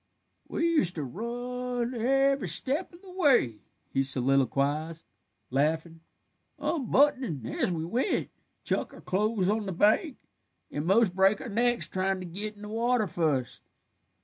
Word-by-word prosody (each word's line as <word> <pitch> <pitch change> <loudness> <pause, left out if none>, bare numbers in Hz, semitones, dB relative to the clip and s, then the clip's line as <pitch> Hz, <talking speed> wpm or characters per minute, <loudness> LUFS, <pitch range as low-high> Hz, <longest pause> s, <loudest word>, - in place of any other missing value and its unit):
"We 335 - 0
used 300 - +2
to 155 - -3
run 245 - -4
every 270 +3 +2
step 285 +7 0
of 345 +2 -17
the 380 - -12
way," 270 - +3 0.3
he 135 - +2
soliloquized, 140 +4 +1 0.5
laughing, 160 +4 0 0.6
"unbuttonin' 260 - +1
as 120 - -1
we 160 -2 -2
went, 245 - -1 0.3
chuck - - -1
our - - -13
clothes 205 0 0
on 210 0 0
the - - -2
bank, 215 - +2 0.5
and 145 +3 -3
'most 195 -1 +3
break 195 +2 +4
our 255 - -6
necks 240 +3 +1
tryin' 190 0 -1
to 185 - -6
git 205 +5 -5
in 205 - -13
the 210 - -7
water 230 +1 +1
fust. 155 - -1
210 Hz, 145 wpm, -28 LUFS, 160-250 Hz, 0.6 s, break